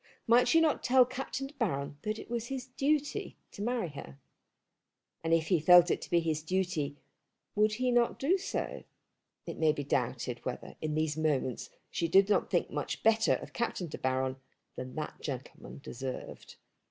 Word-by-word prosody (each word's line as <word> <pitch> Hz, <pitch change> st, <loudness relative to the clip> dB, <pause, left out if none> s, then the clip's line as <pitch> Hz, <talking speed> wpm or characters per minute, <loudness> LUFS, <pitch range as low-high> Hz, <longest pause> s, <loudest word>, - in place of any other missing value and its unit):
Might 235 Hz, +2 st, +5 dB
she 330 Hz, -, +5 dB
not 320 Hz, -2 st, +2 dB
tell 255 Hz, 0 st, +6 dB
Captain 270 Hz, +1 st, -4 dB
De 275 Hz, -, -10 dB
Baron 145 Hz, -, -2 dB
that 215 Hz, +1 st, -2 dB
it -, -, -9 dB
was 235 Hz, 0 st, -3 dB
his 265 Hz, -1 st, -4 dB
duty 285 Hz, +3 st, -1 dB
to -, -, -9 dB
marry 230 Hz, -5 st, -1 dB
her? 70 Hz, -, -10 dB, 1.1 s
And 165 Hz, -, -1 dB
if 165 Hz, -1 st, +2 dB
he 180 Hz, -, +4 dB
felt 175 Hz, +2 st, +7 dB
it -, -, 0 dB
to -, -, -8 dB
be 170 Hz, -, +4 dB
his 160 Hz, -2 st, -1 dB
duty 160 Hz, -4 st, -1 dB, 0.6 s
would 210 Hz, +1 st, +3 dB
he 250 Hz, +3 st, 0 dB
not 240 Hz, -1 st, +2 dB
do 350 Hz, +8 st, +2 dB
so? -, -, -4 dB, 0.6 s
It -, -, -6 dB
may 160 Hz, -1 st, +4 dB
be 145 Hz, -1 st, -4 dB
doubted 125 Hz, -2 st, -2 dB
whether 125 Hz, -, -5 dB
in 155 Hz, -1 st, -2 dB
these 155 Hz, -1 st, 0 dB
moments 145 Hz, -6 st, 0 dB, 0.2 s
she 170 Hz, -, 0 dB
did 195 Hz, +4 st, +5 dB
not 205 Hz, -, +2 dB
think -, -, 0 dB
much -, -, -3 dB
better 225 Hz, 0 st, +4 dB
of -, -, -11 dB
Captain 215 Hz, -6 st, -2 dB
De -, -, -7 dB
Baron 130 Hz, 0 st, 0 dB, 0.4 s
than 130 Hz, 0 st, -7 dB
that 155 Hz, -, -5 dB
gentleman 135 Hz, -3 st, -7 dB
deserved. 130 Hz, +1 st, -7 dB
175 Hz, 180 wpm, -31 LUFS, 145-240 Hz, 1.1 s, felt